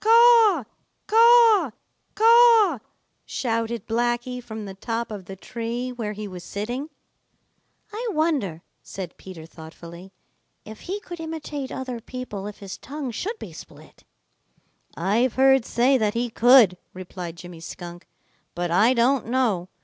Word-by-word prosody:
"Caw, 455 - +6 0.4
caw, 455 - +6 0.5
caw!" 455 - +6 0.4
shouted 230 -2 -3
Blacky 240 +2 -1
from 220 -2 -7
the 195 - -7
top 230 +4 -4
of 200 -3 -7
the 195 - -8
tree 235 +4 -5
where 225 -4 -5
he 210 0 -6
was 180 -2 -9
sitting. 240 - -5 1.0
"I 470 +3 -4
wonder," 295 - -1 0.2
said 185 -3 -8
Peter 185 -4 -11
Rabbit 160 - -15
thoughtfully, 170 +3 -12 0.5
"if 220 0 -10
he 400 +2 -2
could 345 -4 -9
imitate 310 -4 -6
other 255 -3 -5
people 225 -5 -7
if 210 - -9
his 195 -2 -9
tongue 280 -2 -6
should 420 - -4
be - - -10
split." - - -14 0.9
"I've 215 +8 +1
heard 265 -2 +4
say 255 +3 +2
that 215 -1 0
he 240 0 -1
could," 235 -6 +6 0.2
replied 180 -2 -7
Jimmy 175 -1 -11
Skunk, 175 +2 -9 0.5
"but 175 -1 -2
I 220 +9 +4
don't 245 0 +2
know. 230 -8 0
235 Hz, 140 wpm, -24 LUFS, 195-285 Hz, 1.0 s, Caw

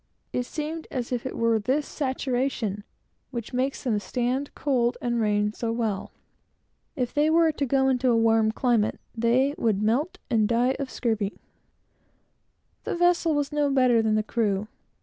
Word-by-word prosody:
It 250 0 -1
seems 315 +1 -5
as 250 -2 -4
if 245 0 -2
it - - -6
were 230 -1 +2
this 265 +7 0
saturation 255 -6 -2 0.5
which 235 -3 -6
makes 260 +2 -1
them 225 -6 +1
stand 250 +6 -2
cold 245 -4 +1
and 240 -1 -1
rain 210 -1 +1
so 230 0 -3
well. 225 -4 -2 0.8
If 250 -5 -2
they 300 +1 +3
were 325 0 +4
to 285 -2 -2
go 265 +1 +2
into 260 -1 +2
a 235 - +4
warm 225 -1 +3
climate, 230 -3 +1 0.2
they 240 +5 +2
would 215 -2 +1
all 270 +10 +2 0.4
die 240 +3 +2
of 280 - -2
the - - -15
scurvy. 220 -4 -1 1.5
The - - -2
vessel 345 -2 +3
was 290 0 -1
no 295 -1 +1
better 255 -4 +4
than 220 -1 +1
the 215 - +1
crew. 210 -3 -1
245 Hz, 165 wpm, -26 LUFS, 225-275 Hz, 1.5 s, were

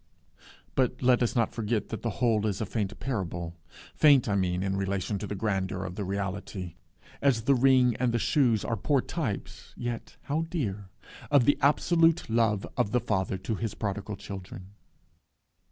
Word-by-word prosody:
But 130 -1 0
let 125 0 +4
us 120 - +1
not 115 -2 +1
forget 110 -2 -1
that 110 - -5
the 115 - -1 0.2
whole 110 -2 +2
is 100 -3 -2
a 110 - -1
faint 105 -1 -3
parable 85 -9 -3 0.4
faint 140 -5 +5
I 105 - +1
mean 90 -1 0
in 95 0 -1
relation 100 +1 -1
to 105 - -5
the 105 - -4
grandeur 95 -2 -1
of 90 - -5
the 100 - -4
reality, 95 -2 -4 0.5
as 130 -6 +2
the 140 - +4
ring 130 -2 +4
and 125 -1 +1
the 120 - +1
shoes 120 -4 +2
are 115 - 0
poor 135 +6 +1
types 130 - -5
(yet 120 -1 -5
how 160 +3 -1
dear!) 105 - -3 0.4
of 145 -4 +5
the 145 - +3
absolute 165 +1 +3
love 110 -3 +2
of - - +2
the 125 - +4
Father 100 -5 -1
to 115 - -1
his 110 0 -3
prodigal 100 0 -3
children. 95 -1 -9
110 Hz, 175 wpm, -28 LUFS, 95-125 Hz, 0.5 s, faint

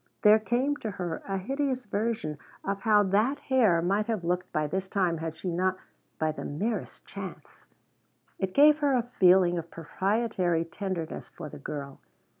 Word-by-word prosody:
There 210 +1 +7
came 255 +6 0
to 220 - -4
her 180 -5 -4
a 195 -1 -1
hideous 265 +5 -2
vision 210 -7 -2 0.2
of 200 0 -2
how 210 -1 +5
that 210 +8 +2
hair 220 - +3
might 200 +4 +1
have 220 -6 -1
looked 180 +1 -1
by 155 0 0
this 190 +6 -2
time 180 -5 0
had 160 -1 -5
she 180 +1 -3
not 185 +2 0 0.4
by 155 0 +1
the 155 - -7
merest 210 +10 -3
chance - - -9 0.7
It 190 -1 -2
gave 300 +1 +7
her 290 -2 +2
a 245 - +2 0.2
feeling 180 -1 +5
of 165 0 -8
proprietary 185 0 0
tenderness 175 -2 -5
for 155 -3 -8
the - - -10
girl. 140 -1 -6
190 Hz, 170 wpm, -28 LUFS, 170-220 Hz, 0.7 s, There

